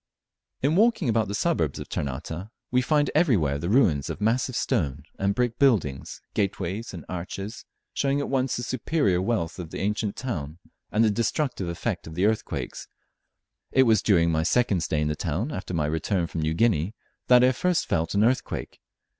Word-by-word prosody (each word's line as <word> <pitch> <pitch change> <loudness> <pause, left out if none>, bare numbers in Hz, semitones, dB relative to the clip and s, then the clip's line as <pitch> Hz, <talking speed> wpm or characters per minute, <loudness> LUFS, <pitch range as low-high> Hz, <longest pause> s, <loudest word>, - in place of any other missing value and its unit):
In 145 +4 +3
walking 220 - +3
about 110 -2 +2
the 100 - -3
suburbs - - 0
of - - -7
Ternate, 80 +8 -4 0.2
we 125 0 +3
find 145 +2 +2
everywhere 100 - +2
the 85 +4 -3
ruins 95 - +3
of - - -5
massive 120 +4 +1
stone 75 - -1 0.2
and 100 +1 +1
brick 120 -2 0
buildings, 95 - +1
gateways 100 +2 -2
and 85 -5 -9
arches, 95 +4 -6 0.3
showing 140 0 +1
at 140 - -2
once 135 -1 0
the 120 - -3
superior 120 - +1
wealth 95 -5 -1
of 85 -3 -6
the - - -6
ancient 105 +1 -1
town 85 - -4 0.3
and 110 - +3
the 110 - +3
destructive 115 - -1
effects 85 - -3
of 80 +1 -9
earthquakes. 105 +4 -1 0.8
It 130 - +5
was 115 -3 +4
during 85 -5 +3
my 80 0 +1
second 100 +2 +2
stay 75 -2 0
in 75 - +1
the 75 - -1
town, 90 - -2
after 95 -7 -5
my 75 -2 +1
return 80 +4 0
from 85 -1 -4
New 80 +1 0
Guinea, 105 -1 +2 0.3
that 125 0 +7
I 130 - +6
first 180 +6 0
felt 80 +3 -1
an 100 - +4
earthquake. 125 +3 -1
105 Hz, 180 wpm, -26 LUFS, 85-125 Hz, 0.8 s, that